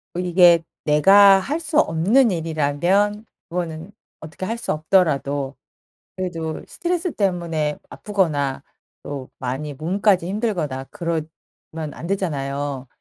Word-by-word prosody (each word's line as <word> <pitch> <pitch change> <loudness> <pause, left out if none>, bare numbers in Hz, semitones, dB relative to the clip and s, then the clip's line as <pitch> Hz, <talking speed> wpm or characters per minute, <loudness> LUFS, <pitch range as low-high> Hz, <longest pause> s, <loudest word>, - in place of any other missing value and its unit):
이게 175 -1 +5 0.2
내가 195 +6 +6
할 285 - -2
수 320 -2 +1
없는 215 - +3
일이라면 170 +6 0 0.2
그거는 170 +1 -4 0.3
어떻게 155 +4 -7
할 230 +4 -3
수 235 - -2
없더라도 145 -5 +1 0.6
그래도 165 -4 -4
스트레스 350 0 -2
때문에 170 -6 -1
아프거나 150 -10 -1 0.4
또 140 -3 -6
많이 135 +4 -4
몸까지 180 +4 +1
힘들거나 180 - -2
그러면 170 -5 -2 0.7
안 165 - -8
되잖아요. 140 -7 -3
170 Hz, 260 characters per minute, -22 LUFS, 150-195 Hz, 0.7 s, 내가